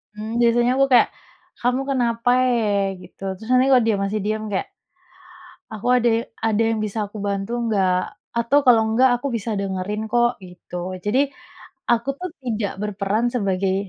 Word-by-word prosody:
Mmm, 220 +2 -4
biasanya 240 +1 +3
aku 275 - +5
kayak, 245 - +6 0.5
"Kamu 250 +2 +1
kenapa 240 -3 0 0.2
e?" 205 -5 +1
Gitu. - - -17
Terus, 220 +5 -12
nanti 255 0 +4
kalau 250 -2 +5
dia 215 -3 +2
masih 205 +2 -1
diam 215 +1 -1
kayak, 195 - -1 1.1
"Aku 215 0 -6
ada 240 -1 +2 0.4
ada 220 0 +2
yang 225 -1 -1
bisa 215 0 -3
aku 205 - -12
bantu 200 +1 -2 0.2
nggak? 195 -4 +2 0.5
Atau 235 +5 +3
kalau 235 -3 +6
nggak, 260 +2 +6
aku 280 - -4
bisa 225 +1 -4
dengerin, 200 +3 -3
kok," 240 +1 +1
gitu. 180 -1 -11 0.3
Jadi 215 +6 +2 0.7
aku, 235 +2 0
tuh, 365 0 -5
tidak 220 -4 -2
berperan 210 +2 -1
sebagai, 195 -4 0
220 Hz, 160 wpm, -22 LUFS, 200-240 Hz, 1.1 s, kayak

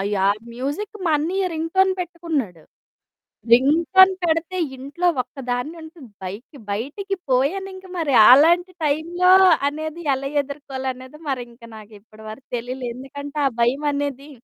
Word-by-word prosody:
Yeah! 200 +2 +2
Music 290 - -4
మా 330 - +2
అన్నయ్య 365 +6 -1
ringtone 375 +4 +2
పెట్టుకున్నాడు. 320 - -4 0.9
రింగ్‌టోన్ 330 +9 +5
పెడితే 330 +2 0 0.2
ఇంట్లో 280 +7 -3 0.2
ఒక్కదాన్నుంటను. 270 +4 -6 0.2
బయటకి, 210 +10 -8
బయటికి 290 - -4 0.2
పోయానింక 375 +9 -1
మరి 300 -5 0 0.2
అలాంటి 340 +7 +5
టైంలో 335 +5 +1 0.4
అనేది 315 +3 -6
ఎలా 275 +1 -4
ఎదుర్కోలనేది 265 -1 -7
మరింక 245 -3 -5
నాకు 215 0 -13
ఇప్పడి 215 +1 -17
వరకు 235 +5 -11
తెలియలే. 250 +2 -5
ఎందుకంటే 285 +3 -8
ఆ - - -8
భయమనేది 280 +2 -1
285 Hz, 110 wpm, -22 LUFS, 255-335 Hz, 0.9 s, రింగ్‌టోన్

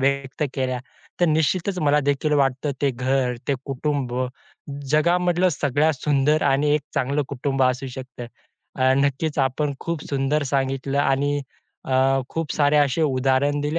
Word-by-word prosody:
व्यक्त 140 +1 -1
केल्या 130 -2 -1 0.4
तर 175 - +5
निश्चितच 170 +4 +1
मला 150 -2 +3
देखील 145 +2 0
वाटतं 140 0 +1
ते 140 - +3
घर, 130 0 0
ते 140 - +3
कुटुंब 135 -2 -2 0.8
जगामधलं 175 +3 +3
सगळ्यात 145 +1 +1
सुंदर 145 +2 +1
आणि 140 +1 +2
एक 150 - +1
चांगलं 140 +3 0
कुटुंब 135 0 -1
असू 130 +1 +1
शकतं. 130 -1 -8 0.5
अ, 130 0 +4
नक्कीच 145 +2 0
आपण 140 +2 0
खूप 170 -3 -4
सुंदर 140 +2 0
सांगितलं 135 0 0
आणि 145 +1 +1 0.5
अ, 135 +1 +3
खूप 165 -3 -3
सारे 145 0 +2
असे 145 +1 +2
उदाहरण 135 +1 +1
दिले 150 +3 -1
140 Hz, 145 wpm, -23 LUFS, 135-150 Hz, 0.8 s, तर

